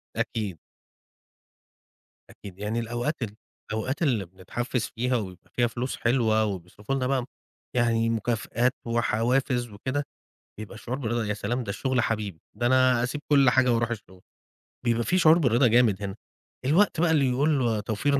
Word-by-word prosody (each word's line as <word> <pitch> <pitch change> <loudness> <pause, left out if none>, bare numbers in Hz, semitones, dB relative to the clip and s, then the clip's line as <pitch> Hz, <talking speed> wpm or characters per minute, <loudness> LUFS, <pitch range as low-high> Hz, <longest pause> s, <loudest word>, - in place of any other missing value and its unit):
أكيد. 105 -6 -2 1.7
أكيد. 95 -2 -12
يعني 105 +3 -2
الأوقات 120 +6 -2
ال 105 -2 -5 0.4
الأوقات 120 +8 -2
اللي 120 - +1
بنتحفّز 105 +7 -3
فيها 125 +2 0
ويبقى 95 -5 -7
فيها 120 -1 +2
فلوس 120 +3 -4
حلوة 115 -3 +2
وبيصرفوا 100 +5 -4
لنا 130 -2 0
بقى 135 -1 +1
م - - -7 0.5
يعني 115 -2 +2
مكافآت 115 +2 0
وحوافز 120 +2 +1
وكده، 130 +7 -3 0.6
بيبقى 110 -1 -8
الشعور 120 +4 -5
بالرضا 120 -3 -1
يا 105 0 -1
سلام! 120 +4 -2
ده 100 - -4
الشُغل 130 +4 0
حبيبي 105 -8 -2 0.2
ده 120 - 0
أنا 130 -1 +4
أسيب 130 +4 -2
كل 140 -3 +6
حاجة 125 0 +4
وأروح 115 0 +1
الشُغل، 100 -5 -7 0.7
بيبقى 120 0 +2
فيه 180 - +1
شعور 165 -2 +6
بالرضا 125 -5 +4
جامد 115 -4 +3
هنا. 95 -1 -4 0.5
الوقت 165 +5 +3
بقى 175 -2 +3
اللي 140 -5 +3
يقول 140 +4 +2
له 115 -4 +1
توفير 115 +7 0
120 Hz, 160 wpm, -26 LUFS, 110-130 Hz, 1.7 s, كل